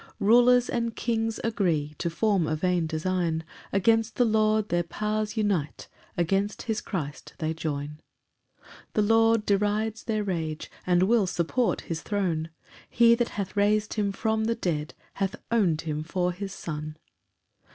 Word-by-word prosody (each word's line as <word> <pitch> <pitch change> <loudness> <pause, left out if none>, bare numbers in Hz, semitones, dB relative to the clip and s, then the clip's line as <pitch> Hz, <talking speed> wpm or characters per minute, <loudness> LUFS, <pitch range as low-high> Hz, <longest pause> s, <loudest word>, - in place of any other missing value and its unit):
4 200 - -2
Rulers 245 +1 +6
and 235 -1 -2
kings 225 -1 -1
agree 170 -10 0
To 170 - -1
form 190 -1 +1
a 155 - 0
vain 175 0 0
design; 165 0 -1 0.3
Against 225 +3 +2
the 245 - +3
Lord 215 -1 +2
their 175 0 +2
powers 210 +5 -2
unite, 190 -9 -1 0.3
Against 195 +4 0
his 220 -3 -2
Christ 150 -7 -5
they 160 0 -1
join. 150 -2 -4 0.6
5 - - -28 0.3
The 215 - +2
Lord 225 0 +4
derides 210 +2 0
their 215 -2 0
rage, 160 -5 -3 0.2
And 180 0 +4
will 215 0 +3
support 180 +8 0
his 165 -1 -5
throne; 175 -6 -1 0.4
He 235 -1 +5
that 235 0 +1
hath 195 -2 -3
rais'd 210 +1 +2
him 205 -2 0
from 220 +2 0
the 230 +1 +1
dead 160 -8 -2 0.2
Hath 195 +3 -2 0.2
own'd 185 -9 +2
him 155 -2 -3
for 180 +2 -1
his 195 +2 -6
Son. 155 -4 -6
200 Hz, 155 wpm, -27 LUFS, 165-220 Hz, 0.6 s, Rulers